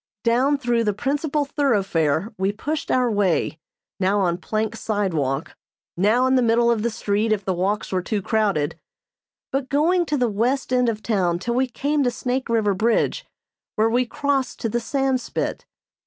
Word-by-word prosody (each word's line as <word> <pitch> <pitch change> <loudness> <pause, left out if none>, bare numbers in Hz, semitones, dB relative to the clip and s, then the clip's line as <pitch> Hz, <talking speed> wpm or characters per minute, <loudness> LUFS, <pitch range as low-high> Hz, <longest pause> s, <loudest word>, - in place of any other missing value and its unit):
Down 255 +5 +3
through 240 -3 +1
the 210 -2 0
principal 290 +4 -1
thoroughfare 200 - 0
we 190 +1 0
pushed 295 +9 -4
our 250 -2 +2
way, 190 -6 +1 0.4
now 195 +2 +2
on 175 -2 0
plank 215 +5 -2
sidewalk, 165 -11 -2 0.4
now 215 +8 +3
in 260 - +2
the 260 - +4
middle 235 0 +3
of 225 -2 0
the 235 - 0
street 215 0 -1
if 205 -2 0
the 190 - 0
walks 195 +4 -1
were 185 -1 0
too 210 +3 -2
crowded; 200 -10 0 0.7
but 270 -1 -2
going 340 +5 +2
to 295 - 0
the 250 -2 +2
west 245 +5 0
end 250 -1 +3
of 215 -1 -4
town 185 -6 +1
till 235 +7 -3
we 260 +2 +1
came 285 +4 -1
to 255 - +3
Snake 255 +1 -3
River 220 -3 +2
Bridge, 225 +4 0 0.5
where 220 +1 +2
we 245 +1 +2
crossed 270 -2 -1
to 225 - -1
the 240 - 0
Sandspit. 265 +1 -2
230 Hz, 175 wpm, -22 LUFS, 200-260 Hz, 0.7 s, the